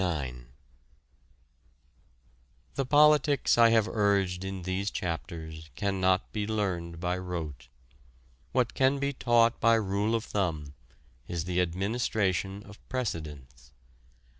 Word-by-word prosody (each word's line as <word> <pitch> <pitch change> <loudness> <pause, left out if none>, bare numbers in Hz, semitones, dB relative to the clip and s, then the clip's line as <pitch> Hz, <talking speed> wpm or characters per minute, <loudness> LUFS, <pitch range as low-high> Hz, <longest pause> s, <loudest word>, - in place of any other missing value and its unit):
The 135 -2 -2
politics 150 0 +5
I 115 -1 +6
have 110 -2 +3
urged 100 -4 +1
in 95 -1 -5
these 95 +3 -1
chapters 80 -2 -5
cannot 95 0 +1
be 105 -1 -2
learned 90 -6 -2
by 90 +1 -1
rote. 80 -9 -5 0.8
What 125 -2 +1
can 135 +1 +3
be 140 0 -1
taught 120 -2 +3
by 115 0 +5
rule 105 +1 0
of 115 - -1
thumb 80 -8 -2 0.5
is 85 -2 -3
the 90 0 +1
administration 95 +1 -1
of 105 0 -14
precedents. 75 - -5
95 Hz, 110 wpm, -29 LUFS, 85-115 Hz, 0.8 s, I